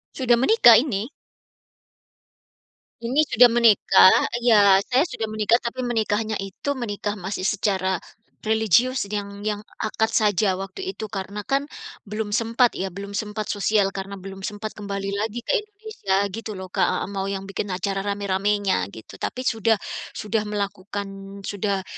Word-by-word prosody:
Sudah 240 -3 +3
menikah 255 - +7
ini. 230 -3 -2 1.9
Ini 280 +6 +2
sudah 245 +1 +6
menikah. 215 - +6 0.2
Iya, 205 -5 +6
saya 260 +3 +3
sudah 225 -10 -4
menikah, 215 +2 +2
tapi 250 +2 -4
menikahnya 220 -2 -1
itu 195 +9 -4
menikah 205 -2 -3
masih 190 0 -4
secara 190 -3 0 0.4
religius, 220 +4 +2
yang 200 0 -5
yang 210 -1 -1 0.2
akad 220 +1 0
saja 205 -2 +2
waktu 195 - -6
itu. 215 -1 -7
Karena 200 +1 -5
kan 275 +4 0 0.4
belum 210 +1 -4
sempat 230 +2 +2
ya, 190 - -3
belum 200 0 -7
sempat 210 +1 -3
sosial 205 -1 +1
karena 195 +1 -6
belum 195 0 -9
sempat 210 +1 -5
kembali 200 -1 -4
lagi 220 +4 -3
ke - - -2
Indonesia 420 - -4 0.2
gitu 225 +1 -6
loh 185 -1 -8
Kak - - +2
heeh, - - -2
mau 195 0 -3
yang 195 -1 -3
bikin 195 +1 -4
acara 195 +1 -2
rame-ramenya 200 - 0
gitu. 110 - -12
Tapi 255 - -3
sudah 225 -2 +2 0.4
sudah 215 0 -2
melakukan, 200 -1 -5
sudah 200 -1 -2
205 Hz, 145 wpm, -23 LUFS, 195-230 Hz, 1.9 s, menikah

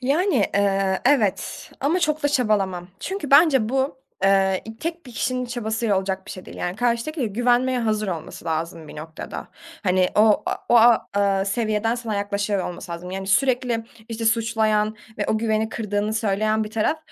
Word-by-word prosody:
Yani, 300 +6 +1 0.2
eee, 195 -1 +1
evet 245 -7 +1
ama 320 +7 +1
çok 305 -2 0
da 290 - +3
çabalamam 200 -9 0
çünkü 380 -6 -4
bence 275 -6 +6
bu, 265 +1 -1 0.3
eee, 195 -1 +3
i 225 0 -9
tek 335 0 -5
bir 245 - -11
kişinin 250 +2 -1
çabasıyla 220 -3 -1
olacak 190 0 -3
bir - - -8
şey 185 - -8
değil, - - -11
yani, 180 +1 -3
karşıdaki 245 +6 -1
ile 245 - +1
güvenmeye 245 +4 +2
hazır 215 -3 0
olması 165 -2 -6
lazım 165 0 -3
bir - - -10
noktada. 160 +1 -7 0.3
Hani, 185 -1 +3
o 210 0 +4
a - - 0
o, 235 0 +7 0.2
ııı, 195 -1 +2
seviyeden 215 +2 0
sana 235 -3 -4
yaklaşıyor 200 -1 -1
olması 175 0 -7
lazım, 175 +2 -7
yani, 190 0 -5
sürekli, 245 +1 +1 0.2
işte, 225 0 -4
suçlayan 220 -2 +1 0.2
ve 205 - -1
o 215 - +1
güveni 220 0 0
kırdığını 210 -1 -2
söyleyen 215 0 +1
bir 210 - -8
taraf 225 +9 0
220 Hz, 175 wpm, -23 LUFS, 195-245 Hz, 0.3 s, o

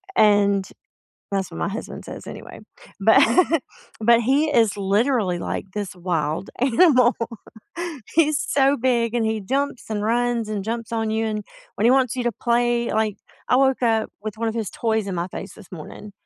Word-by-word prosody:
and- 200 -2 +4 0.6
that's 195 -2 -1
what - - -8
my - - -1
husband 220 +4 -7
says - - -9
anyway- - - -9 0.4
but - - +6 0.8
but 235 +2 +4
he 275 +6 +2
is 225 -3 +3
literally 200 -2 +1
like - - -4
this 205 -3 -4
wild 165 -1 -2
animal. 255 -1 +4 1.0
He's 305 -3 +3
so 275 0 +2
big, 240 -2 +1
and 230 -2 +1
he 220 -1 -1
jumps, 270 +5 -2
and 210 -1 -2
runs, 235 0 0
and 205 -2 -2
jumps 230 0 -4
on 225 -1 -1
you, 220 +1 0
and 215 -1 -3 0.3
when 220 - +2
he - - +6
wants 260 -1 +3
you 250 - -1
to 240 - +1
play, 240 +1 0
like, 215 -1 0 0.3
I 250 - +4
woke 265 -1 +2
up 225 -2 +1
with 215 0 -5
one 230 0 0
of 220 - -3
his 220 -4 -2
toys 220 -3 -1
in 190 - -3
my 170 +1 -2
face 195 - -8
this 195 -4 -16
morning, 185 +5 -9
225 Hz, 180 wpm, -22 LUFS, 205-245 Hz, 1.0 s, but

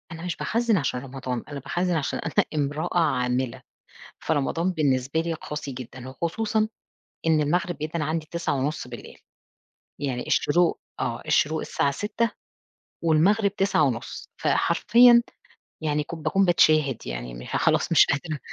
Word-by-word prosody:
أنا 165 0 -8
مش 180 - -2
باخَزّن 230 -2 +1
عشان 135 -5 -1
رمضان، 130 -2 -5
أنا 145 -2 -6
باخَزّن 175 +6 -1
عشان 150 -4 -1
أنا 165 - +1
إمرأة 150 +4 -1
عاملة، 125 -5 0 0.6
فرمضان 160 +4 0
بالنسبة 140 -3 +1
لي 165 0 -2
قاسي 150 -2 -6
جدًا 130 0 -9
وخصوصًا، 215 - -1 0.6
إن 160 -1 +4
المغرب 175 +4 0
بيدَّن 155 +2 -3
عندي 155 +1 -2
21:30، 140 -6 -3 0.8
يعني 130 -4 -3
الشروق 170 +3 +2 0.2
آه، - - -2
الشروق 155 +1 +2
الساعة 140 - 0
06:00 215 +9 -1 0.7
والمغرب 195 +6 +3
21:30، 140 -11 0
فحرفيًا 240 0 +5 0.6
يعني 150 -1 0
كُ 170 - -7
باكون 160 +5 +1
باتشاهد 155 - +3
يعني - - -5
م - - -9
ها - - -4
خلاص، - - +2
مش - - +7
قادرة. 150 +2 -2
155 Hz, 135 wpm, -25 LUFS, 135-175 Hz, 0.8 s, مش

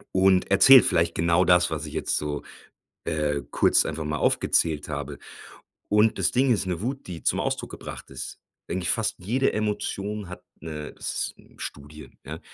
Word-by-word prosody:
und 95 -1 +4
erzählt 115 +7 +8
vielleicht 85 -2 +1
genau 85 +2 +3
das, 90 0 +4
was 80 -1 -4
ich 75 - -8
jetzt - - -1
so, 75 -1 -3 0.6
äh, 75 -2 -1
kurz - - +3
einfach 80 0 -4
mal 75 0 -2
aufgezählt 75 -3 +1
habe. 70 -1 -5 0.7
Und 105 +2 +3
das - - +1
Ding 130 +1 +3
ist 100 -4 0
'ne 90 -2 -2
Wut, 135 +5 -4
die 85 -3 -7
zum - - +1
Ausdruck - - -2
gebracht - - -9
ist. 65 -2 -7 0.3
Eigentlich 90 -1 -2
fast 110 -1 0
jede 120 +9 0
Emotion 105 -1 -3
hat 90 - -9 0.2
'ne 75 -2 -7
s - - -3
s - - -19 0.2
Studie 75 -1 -9 0.2
ja, - - -7
90 Hz, 170 wpm, -25 LUFS, 75-105 Hz, 0.7 s, erzählt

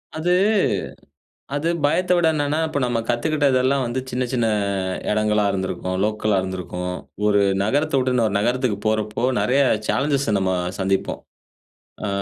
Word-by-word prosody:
அது 160 +3 0 1.2
அது 145 +3 -1 0.2
பயத்தை 180 +5 +2
விட 175 -2 +3
என்னன்னா, 145 0 0
இப்ப 155 - -3
நம்ம 120 -2 0
கத்துக்கிட்டதெல்லாம் 135 0 +2
வந்து, 120 +2 -2
சின்ன 125 +1 -1
சின்ன 120 -3 +1 0.6
இடங்களா 105 0 +2
இருந்திருக்கும், 95 -1 -3
லோக்கலா 105 -1 +1
இருந்திருக்கும், 90 -1 -4 0.3
ஒரு 105 -1 +4 0.2
நகரத்த 145 +9 0
விட்டுன்னு 125 -2 +1
ஒரு 100 - -3
நகரத்துக்கு 120 0 0
போறப்போ, 110 +1 -1 0.2
நிறைய 135 +3 +2 0.3
சேலஞ்சஸை 140 -4 +1
நம்ம 95 -1 0 0.3
சந்திப்போம், 95 0 -1 0.9
ஆ - - -2
120 Hz, 130 wpm, -22 LUFS, 105-140 Hz, 1.2 s, ஒரு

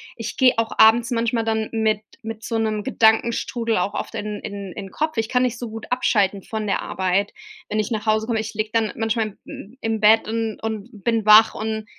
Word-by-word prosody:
Ich 225 -1 -6
gehe 255 -1 +5
auch 225 -1 0
abends 230 +2 +5
manchmal 230 -1 0
dann 220 -1 0
mit 220 -2 +1 0.2
mit 225 -1 -7
so 230 - -2
'nem 215 -1 -1
Gedankenstrudel 230 0 +1
auch 180 +3 -1
oft - - -5
in 210 0 -4
in 200 -2 -7
in 195 -1 -8
Kopf. 310 -2 -2
Ich 225 -1 0
kann 250 0 +2
nicht 245 -2 -1
so 240 - -5
gut 225 0 -8
abschalten 205 -5 +1
von 220 -1 -4
der 195 - 0
Arbeit, 190 +2 -1 0.4
wenn 215 - -1
ich 215 - -2
nach 215 -1 -2
Hause 220 0 +1
komme. 230 -2 0
Ich 220 0 -5
liege 215 0 -3
dann 225 -2 +1
manchmal 225 -2 -2
m 220 +7 -11
im 225 -1 -1
Bett 215 +1 +5
und 225 -1 -3
und 220 -2 -4
bin 225 -1 0
wach 215 +1 +7
und 220 0 -3
220 Hz, 215 wpm, -22 LUFS, 215-230 Hz, 0.4 s, wach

